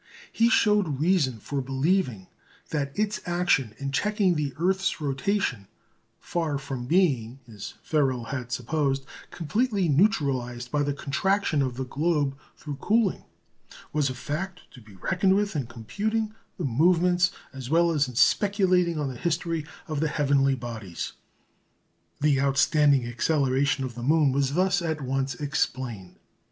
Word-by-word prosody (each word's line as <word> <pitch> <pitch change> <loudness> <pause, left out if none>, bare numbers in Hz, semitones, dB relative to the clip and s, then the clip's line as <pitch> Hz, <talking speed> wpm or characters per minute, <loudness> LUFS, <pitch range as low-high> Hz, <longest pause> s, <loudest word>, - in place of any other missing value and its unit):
He 230 +1 +3
showed 210 - +3
reason 155 -7 +2
for 135 +6 -3
believing 135 - 0 0.5
that 140 -3 -1
its 210 -1 0
action 175 -10 +1
in 140 -1 -4
checking 205 +4 +2
the 150 -3 -1
earth's 190 +2 0
rotation, 140 - -1 0.5
far 160 -4 -2
from 135 -3 -5
being, 135 -9 +2
as 105 -4 -9
Ferrel 135 -6 +1
had 125 -3 -4
supposed, 135 +2 -1 0.2
completely 200 - 0
neutralised 135 - +1
by 145 - +1
the 145 -1 -1
contraction 155 +3 0
of 130 -2 -1
the 130 - -2
globe 145 0 0 0.2
through 145 -2 -6
cooling, 210 +5 +1 0.7
was 150 -3 +1
a 130 - -5
fact 175 +8 -4
to 125 - -14
be 105 -3 -16
reckoned 190 - +1
with 205 -2 0
in 135 -6 -2
computing 210 - -2 0.2
the - - -2
movements, 175 +6 +3 0.2
as 130 -2 -7
well 170 +2 +4
as 145 -3 +2
in 125 - -9
speculating 185 - +3
on 150 -2 -1
the 130 - -5
history, 165 -2 -1 0.2
of 155 -3 -2
the 160 - +1
heavenly 140 -2 +2
bodies. 110 -8 -6 1.1
The 145 -2 +3
outstanding 140 -1 +3
acceleration 135 +2 +1
of 130 -2 -4
the 120 - -8
moon 150 +2 +3
was 140 +1 0
thus 185 +1 +2
at 160 -3 -2
once 135 0 -1
explained. 130 -8 -3
145 Hz, 145 wpm, -26 LUFS, 130-175 Hz, 1.1 s, well